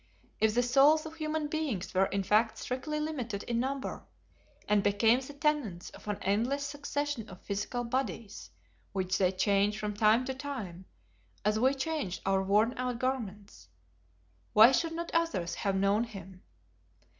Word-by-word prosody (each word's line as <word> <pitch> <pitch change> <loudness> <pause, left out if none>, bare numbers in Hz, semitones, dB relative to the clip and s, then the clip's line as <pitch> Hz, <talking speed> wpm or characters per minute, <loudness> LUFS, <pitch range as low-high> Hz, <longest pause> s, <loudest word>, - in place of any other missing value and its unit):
If 220 0 +2
the 245 - +3
souls 280 +6 +5
of 315 - -7
human 310 -1 -2
beings 290 - -3
were 190 +1 +3
in 200 0 -1
fact 215 +3 +2
strictly 285 +4 -3
limited 250 -10 -3
in 235 -1 -1
number, 270 +2 -3 0.6
and 210 -1 +3
became 205 +4 +3
the 265 +2 -9
tenants 280 - -1
of - - -14
an 205 -1 -1
endless 235 +9 0
succession 285 -4 -3
of 185 - -12
physical 205 +5 -3
bodies 230 - -3 0.4
which 185 -1 -1
they 185 -2 +3
change 200 +2 +2
from 210 -1 -3
time 215 +4 +3
to 265 - -2
time 250 -11 -6 0.6
as 215 +1 +2
we 260 +4 +3
change 275 - -2
our 195 0 +2
worn 210 +5 +3
out 250 -1 -1
garments, 210 - -4 0.8
why 220 +4 +9
should 325 +4 +1
not 340 +1 -4
others 330 - 0
have 195 -1 -1
known 200 +4 +2
him? 190 -4 -11
230 Hz, 155 wpm, -30 LUFS, 200-275 Hz, 0.8 s, why